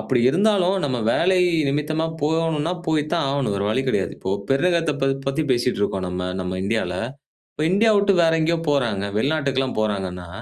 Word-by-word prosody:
அப்படி 125 -2 0
இருந்தாலும் 195 0 +2
நம்ம 130 -3 -1 0.2
வேலை 185 +2 +2 0.3
நிமித்தமா 155 +3 -1 0.2
போகணும்னா, 160 +1 0
போய் 155 -2 +1
தான் 170 -4 +1
ஆகணும் 135 -7 -1
வேற 100 0 -2
வழி 130 +4 0
கிடையாது. 100 -6 0
இப்போ 95 - -3 0.2
பெருநகத்த 165 +2 +2 0.4
பத்தி 140 +3 -1
பேசிட்டு 120 -3 0
இருக்கோம் 95 -2 -1
நம்ம 90 0 -3
நம்ம 90 0 -4
இந்தியால. 100 -4 -1 0.6
இப்போ 155 - -3
இந்தியாவ 215 +1 +4
விட்டு 200 0 +3
வேற 165 - +4
எங்கேயோ 165 +1 +1
போறாங்க. 115 -8 0
வெளிநாட்டுக்கெல்லாம் 135 -3 0
போறாங்கன்னா, 95 -4 -3
140 Hz, 160 wpm, -22 LUFS, 105-165 Hz, 0.6 s, இந்தியாவ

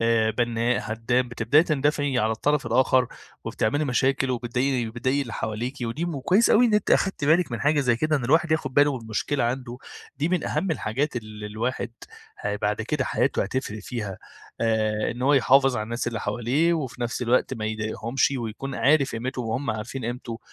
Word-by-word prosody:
آآ، 115 -1 +3
بنَّاء، 120 +1 0
هدَّام، 120 +3 0
بتبدئي 120 +6 +3
تندفعي 145 -3 0
على 110 -1 +2
الطرف 145 +6 0
الآخر، 130 +1 +3 0.4
وبتعملي 145 +8 0
مشاكل 135 0 +1
وبتضايق 125 0 -1
وبتضايقي 130 +5 -1
اللي 120 -4 -8
حواليكِ. 110 +4 -3
ودي 120 +8 -2
مو 165 -5 -3
وكويس 190 - +3
أوي 245 +3 +6
إن 220 - +2
أنتِ 210 - +1
أخدتِ 195 -6 +2
بالِك 160 -2 +3
من 120 - -3
حاجة 150 +1 +3
زي 120 -4 +2
كده، 155 +5 +1
إن 135 - -3
الواحد 160 +5 +3
ياخد 135 -5 -1
باله 145 -2 +4
من 115 - -12
مشكلة 120 +4 -1
عنده، 125 0 -3 0.4
دي 155 +3 0
من 180 0 0
أهم 190 - -1
الحاجات 135 0 -1
اللي 110 -2 -6
الواحد 115 +2 -3 0.5
ه 105 0 -2
بعد 105 +1 -1
كده 130 +3 -1
حياته - - +1
هتفرِق 110 0 -3
فيها. 105 -6 -5 0.4
آآ، 110 -2 +1
إن 120 +2 -6
هو 140 +2 +4
يحافظ 135 -1 +4
على 110 - -1
الناس 120 +2 -4
اللي 115 -3 -4
حواليه، 125 +10 +1
وفي 130 -6 -4
نفس 120 +1 -2
الوقت 125 +2 +2
ما 110 - -5
يضايقهمش، 110 +4 -1
ويكون 120 +3 -5
عارف 140 -1 +3
قيمتهُم 125 +2 -3
وهُم 130 +3 -1
عارفين 110 +3 -5
قيمته. 120 -1 -5
125 Hz, 185 wpm, -25 LUFS, 115-140 Hz, 0.5 s, أوي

